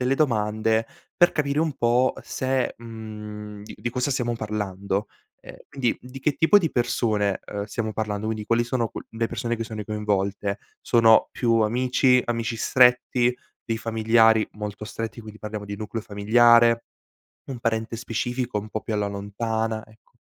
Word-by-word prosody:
delle 130 +2 +2
domande 110 -4 +1 0.3
per 175 -1 +5
capire 145 0 0
un 160 -3 0
po' 120 +2 +2
se, 130 -1 -1
mhmm 110 -2 -8 0.3
di - - -10
di 120 - -3
cosa 125 +3 -1
stiamo 120 -2 0
parlando, 100 -2 -3 0.4
ehm, - - -11
quindi 125 -4 -1
di 130 +2 -10
che 150 - +2
tipo 160 +6 +5
di 165 -5 -1
persone, 105 -5 0
ehm, 100 0 -4
stiamo 110 +1 -3
parlando, 105 -1 -3
quindi 110 -1 -3
quali 120 +1 +2
sono 120 -2 -1
qu - - -7
le 115 0 -1
persone 120 +1 -2
che 115 - -3
sono 110 -2 -6
coinvolte? 100 -1 -1 0.2
Sono 115 -2 +5
più 115 -2 +1
amici? 125 +3 +3
Amici 115 -1 -2
stretti? 125 0 +4 0.3
Dei 115 - -2
familiari 110 0 +3
molto 105 0 -6
stretti, 115 0 -5
quindi 110 -1 -11
parliamo 105 -1 -6
di 100 0 -5
nucleo 110 +1 -5
familiare? 115 +3 +4 0.7
Un 130 - -5
parente 115 -1 -1
specifico 120 0 -2
un 105 +1 -8
po' 110 - -3
più 110 - -4
alla 105 -1 0
lontana? 110 +2 -3
Ecco. 110 -1 -24
115 Hz, 165 wpm, -24 LUFS, 105-120 Hz, 0.7 s, per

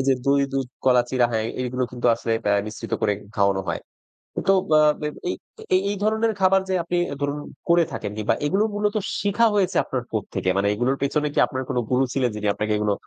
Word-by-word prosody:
এইযে 135 0 +3
দই, 140 0 +3
দুধ, 135 -2 -1 0.2
কলা, 125 -2 +5
চিড়া 125 -2 +3
হ্যাঁ, 110 -1 0 0.2
এইগুলো 125 0 -1
কিন্তু 125 0 -2
আসলে 115 - -3
বেয় 100 0 +3
মিশ্রিত 110 - -7
করে 105 - +3 0.2
খাওয়ানো 100 -2 +2
হয়। - - -2 0.7
তো 195 - +6 0.2
আ - - +6 0.5
এই - - -1 0.4
এই 185 - +4
এই - - -2
ধরনের 220 +1 +2
খাবার 190 0 +5
যে - - +1
আপনি 175 +1 -2 0.2
ধরুন 145 +1 -1 0.3
করে 170 0 +5
থাকেন 105 -5 -4
কিংবা 110 +1 +1
এইগুলো 195 +8 +2
মূলত 210 +1 0 0.3
শিখা 205 +3 +2
হয়েছে 195 -3 +2
আপনার 125 -2 -3
কোত্থেকে? 100 -3 -2
মানে 100 +1 +2
এগুলোর 125 +6 0
পেছনে 150 +2 +1
কি - - +1
আপনার 130 -1 -4
কোন - - -1
গুরু 125 +1 +3
ছিলেন? 130 -2 +1
যিনি 105 0 -2
আপনাকে 105 +1 -1
এগুলো 105 -1 +1
130 Hz, 200 wpm, -23 LUFS, 110-175 Hz, 0.7 s, তো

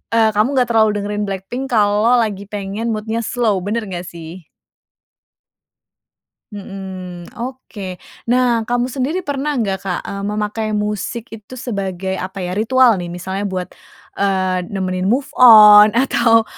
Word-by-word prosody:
eee, 220 -1 +4
kamu 220 +7 +1
nggak 250 -2 +2
terlalu 220 -1 +4
dengerin 205 +1 -3
BLACKPINK 195 +7 -5
kalau 210 +1 +3
lagi 205 -3 -2
pengen 205 +3 -4
mood-nya 220 +2 -3
slow. 220 -4 0
Benar 215 +3 -3
nggak 175 0 -5
sih? 170 -1 -10 2.0
Mhm, 190 -3 -8
oke 240 -5 -7 0.4
nah 240 -2 +2
kamu 245 +1 0
sendiri 300 +8 -2
pernah 285 +1 -2
nggak 200 -6 -1
Kak, 180 - -1
eee, 200 - -6
memakai 210 +1 -2 0.2
musik 210 +2 -4
itu 220 +4 -12
sebagai 190 -6 -4
apa 190 0 -5
ya 180 - -3
ritual 235 -2 +4
nih 175 - -5
misalnya 190 +3 -4
buat, 185 -1 -4 0.5
eee, 185 -2 0
nemenin 185 -1 -2
move 270 +6 0
on 215 -3 +9
atau 235 -3 +3
210 Hz, 140 wpm, -18 LUFS, 190-235 Hz, 2.0 s, on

